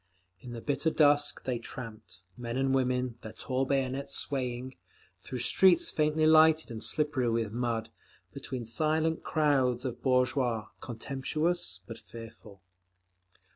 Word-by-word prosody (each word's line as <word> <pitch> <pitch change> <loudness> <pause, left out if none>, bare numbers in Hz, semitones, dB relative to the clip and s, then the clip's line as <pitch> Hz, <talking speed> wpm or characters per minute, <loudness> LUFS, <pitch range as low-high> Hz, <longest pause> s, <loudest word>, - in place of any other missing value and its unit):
In 125 -1 -9
the 115 - -7
bitter 145 +4 0
dusk 145 -2 +3
they 125 -2 -2
tramped, 110 -6 -8
men 120 0 -5
and 135 0 +1
women, 125 -2 0
their 110 0 -8
tall 130 +3 -2
bayonets 135 0 -1
swaying; 130 -1 -4 0.5
through 130 - -6
streets 175 +8 +4
faintly 155 0 +1
lighted 160 -2 +5
and 110 -1 -5
slippery 150 -5 +2
with 115 -2 -1
mud, 115 -1 -2 0.4
between 125 -3 -6
silent 155 +6 0
crowds 135 -5 +1
of 125 - -4
bourgeois, 125 -3 +1
contemptuous 135 - -2
but 115 - -9
fearful…. 110 -4 -12
130 Hz, 130 wpm, -30 LUFS, 115-145 Hz, 0.5 s, lighted